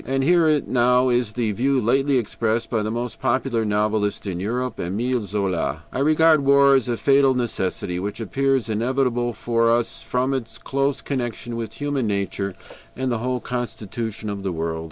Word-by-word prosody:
And 135 +1 -1
here 160 -1 +4
now 125 +1 +3
is 120 -3 +1
the 115 -2 0
view 130 +6 +1
lately 135 +4 +2
expressed 115 0 -1
by 115 -3 +1
the 105 - -2
most 120 +1 -4
popular 130 -2 0
novelist 105 0 0
in 90 -3 -3
Europe, 120 +4 -2
Émile 120 +8 -1
Zola: 100 -4 -2
"I - - -2
regard 155 +1 +4
war 140 0 +6
as 130 -3 +2
a 120 - 0
fatal 135 0 +4
necessity, 95 -6 -2
which 100 +4 -4
appears 135 +2 0
inevitable 120 +2 0
for 115 +1 +1
us 115 0 0
from 130 +2 -1
its 130 -4 -4
close 140 +1 -1
connection 120 -3 -3
with 115 -1 -5
human 140 -2 -1
nature 100 -1 -2 0.4
and 130 -1 -2
the 115 - -1
whole 125 +1 -2
constitution 115 -3 -4
of 100 -1 -4
the 95 -1 -2
world. 80 -1 -3
120 Hz, 175 wpm, -23 LUFS, 110-130 Hz, 0.4 s, war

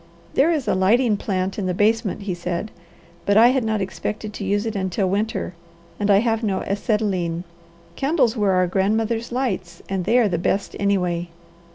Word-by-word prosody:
"There 280 +5 +4
is 300 -6 -1
a - - +3
lighting 210 +5 +3
plant 190 -1 -2
in 190 - -1
the 180 - -1
basement," 215 0 +1
he 195 -2 -2
said, 175 +4 -4 0.5
"but 200 +1 +3
I 235 +2 +8
had 260 -1 +1
not 220 -2 0
expected 210 +3 -4
to - - -6
use 205 +2 0
it 225 -1 -3
until 190 0 0
winter, 205 0 -1 0.5
and 205 0 0
I 200 0 +6
have 225 -1 0
no 200 -4 -1
acetylene. 195 -5 -1 0.5
Candles 270 -5 +2
were 205 -4 +2
our 185 0 +3
grandmothers' 220 +5 0
lights 190 -9 -3
and 190 -2 -2
they 230 +4 +3
are 240 -3 +4
the 175 -4 -1
best 195 +3 -1
anyway. 180 -4 0
205 Hz, 185 wpm, -22 LUFS, 185-225 Hz, 0.5 s, I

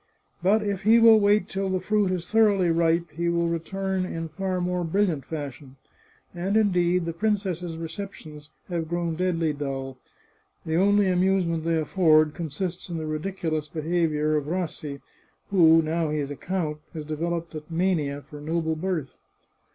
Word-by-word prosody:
But 205 +4 +3
if 200 -2 -2
he 220 +3 +5
will 225 -1 +7
wait 205 -1 +3
till 195 -1 -2
the 185 0 0
fruit 205 +1 +1
is 180 -2 -3
thoroughly 205 -5 +3
ripe 165 0 +1
he 170 +2 -1
will 170 0 +1
return 190 +3 -2
in 165 -2 -4
far 185 +3 -2
more 180 0 -1
brilliant 170 -5 0
fashion. 140 -3 -7 0.6
And 185 +4 0
indeed, 180 -4 +2
the 165 - -3
princess's 180 -4 -1
receptions 160 -3 -8 0.2
have 170 -3 -3
grown 170 -1 -1
deadly 165 -3 0
dull; 135 -2 -5 0.7
the 160 - -2
only 200 +3 +4
amusement 180 -3 +1
they 165 0 +2
afford 155 -2 +3
consists 175 +3 -4
in 170 - -3
the 160 - -4
ridiculous 155 -1 -3
behaviour 155 -1 0
of 145 -1 -3
Rassi, 155 -5 -4 0.5
who, 165 -4 +6
now 160 0 -1
he 155 - -1
is 145 -1 -2
a - - -4
count, 155 -2 -3 0.2
has 155 -2 -5
developed 165 +2 -3
a 155 - -5
mania 160 -5 0
for 150 0 -11
noble 160 +1 -1
birth. 160 -5 -2
170 Hz, 160 wpm, -25 LUFS, 155-185 Hz, 0.7 s, will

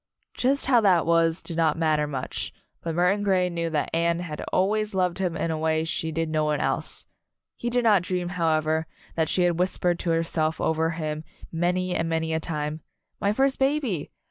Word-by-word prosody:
Just 275 +2 +1
how 250 -3 +5
that 185 -6 +4
was, 165 0 +2
did 170 - -6
not 160 -2 +2
matter 155 -2 +2
much, 135 -3 -4 0.3
but 165 -1 -3
Murton 180 +4 +2
Grey 185 -3 +2
knew 170 -1 -2
that 150 -2 -1
Anne 170 +1 +2
had 155 -4 -5
always 210 +2 +1
loved 180 -1 +1
him 180 -3 -1
in 165 - -1
a 160 - -2
way 160 0 +1
she 160 0 -2
did 165 +1 -1
no 155 -1 0
one 150 -1 +1
else. - - 0 0.5
He 240 - -3
did 245 0 +1
not 210 -5 +5
dream, 180 0 -2
however, 160 -2 +1 0.3
that 160 -2 0
she 180 - +2
had 175 -1 +1
whispered 180 -1 +1
to 175 - -2
herself 165 -1 0
over 160 0 +1
him, 155 -2 -3 0.3
many 180 +2 0
and 165 -1 -1
many 160 0 0
a 160 - +1
time, 155 -1 -3 0.4
"My 200 - +2
first 270 +4 +1
baby!" 270 - 0
165 Hz, 195 wpm, -25 LUFS, 160-185 Hz, 0.5 s, how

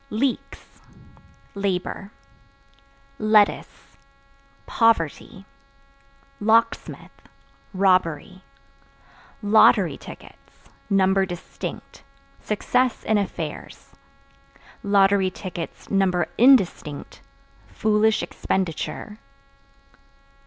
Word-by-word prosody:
Leeks 250 +3 -4 0.7
Labor. 195 0 -3 1.1
Lettuce 205 -10 +1 0.7
Poverty. 200 -2 0 0.9
Locksmith 230 +2 0 0.4
Robbery. 185 -2 0 1.0
Lottery 205 +2 +4
Tickets - - -14 0.3
(Number 190 -1 +2
distinct) 175 -2 -8 0.4
success 250 - 0
in 215 -1 +1
affairs; 200 - -6 0.9
(number 195 -2 0
indistinct) 200 - +2 0.5
foolish 215 0 +1
expenditure. 190 +4 -4
200 Hz, 50 wpm, -23 LUFS, 185-215 Hz, 1.1 s, Lottery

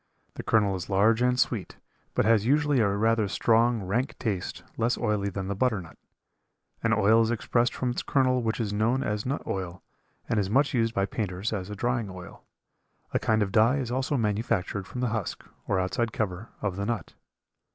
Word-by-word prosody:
The - - -6
kernel 105 -3 +2
is 90 - -6
large 110 +4 +3
and 125 0 +2
sweet, - - -1 0.4
but - - +2
has 110 -2 +4
usually 145 +2 +3
a 110 - +4
rather 110 +1 +2
strong, 115 +2 +2
rank 120 +9 -1
taste, 100 -7 -3
less 115 +2 +1
oily 105 -3 0
than 95 0 -4
the 100 - -1
butternut. 100 - -1 0.9
An 115 - +1
oil 110 +1 +5
is 115 - +1
expressed 120 +1 +1
from 125 -1 -1
its 120 - -2
kernel 130 -2 +2
which 115 0 -1
is 105 -3 -1
known 115 +6 +1
as 105 +2 -2
nut 140 +3 -2
oil, 90 -2 -4 0.4
and 115 - +1
is 95 -2 0
much 140 +7 +2
used 115 -2 +1
by 100 - +2
painters 100 0 -3
as 95 -3 -4
a 105 - -5
drying 120 -1 -1
oil. 90 -1 -10 0.7
A - - +2
kind 110 -1 +2
of 95 - -3
dye 115 +6 +4
is 125 -4 -3
also 130 +3 0
manufactured 105 -3 -1
from 125 - -5
the 125 - +1
husk, 110 -4 -4 0.2
or 100 - +1
outside 95 +6 -1
cover, 105 0 -3
of 100 -3 -1
the 100 - -2
nut. 115 -2 -3
110 Hz, 195 wpm, -27 LUFS, 100-120 Hz, 0.9 s, oil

